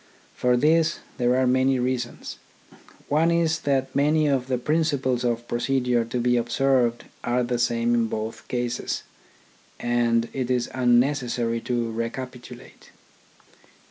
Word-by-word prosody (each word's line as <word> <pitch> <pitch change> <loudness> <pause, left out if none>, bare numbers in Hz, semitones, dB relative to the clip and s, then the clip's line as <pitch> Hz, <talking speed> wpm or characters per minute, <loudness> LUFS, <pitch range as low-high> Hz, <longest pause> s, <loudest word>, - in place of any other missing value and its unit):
For 125 0 +2
this 160 +4 +3 0.2
there 125 0 +3
are 130 0 +2
many 130 +1 +3
reasons. 125 -1 -3 0.7
One 155 +3 +2
is 165 -1 +1
that 135 -3 -1
many 150 +2 +3
of 135 -3 +1
the 130 -1 0
principles 140 -3 0
of 120 -1 -1
procedure 120 0 +1
to 115 +2 -3
be 125 0 +2
observed 120 0 +1 0.2
are 125 +1 +1
the 120 0 -1
same 120 0 +1
in 115 -1 +2
both 110 +1 -5
cases, 120 -1 -2 0.8
and 120 -1 +1
it 130 -2 -3
is 125 -1 0
unnecessary 120 -2 +1
to 120 -2 -2
recapitulate. 125 +2 -7
125 Hz, 130 wpm, -24 LUFS, 120-135 Hz, 0.8 s, this